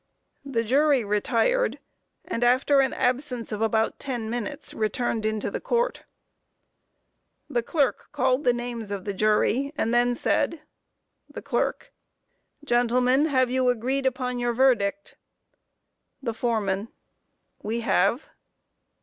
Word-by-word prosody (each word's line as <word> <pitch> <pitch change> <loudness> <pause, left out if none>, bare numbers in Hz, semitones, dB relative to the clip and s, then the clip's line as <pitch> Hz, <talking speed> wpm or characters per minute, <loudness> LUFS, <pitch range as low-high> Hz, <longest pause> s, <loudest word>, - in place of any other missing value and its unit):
The 260 -5 -1
jury 275 +2 +3
retired, 230 - +1 0.5
and 230 - -2
after 260 +3 +4
an 265 -1 +3
absence 250 -2 -1
of 210 0 -3
about 220 0 +1
ten 240 -5 -4
minutes 235 -3 -5
returned 220 0 -1
into 215 -1 -2
court. 485 +1 -1 1.4
The 240 - 0
clerk 275 +2 -1
called 260 +2 +1
the 245 - +4
names 240 -3 -5
of 200 -2 -5
the 200 - -2
jury 215 +7 +1
and 230 -5 0
then 245 0 +3
said: 315 +5 0 0.7
THE - - -9
CLERK: - - -2 0.7
Gentlemen, 250 +2 +2
have 260 -4 +2
you 255 -1 +2
agreed 260 +3 0
upon 250 -1 -2
your 240 0 0
verdict? 255 0 +1 1.0
THE 240 -4 -3
FOREMAN: 220 -4 -1 0.7
We 230 +3 -2
have. 225 +5 +1
245 Hz, 120 wpm, -25 LUFS, 225-265 Hz, 1.4 s, after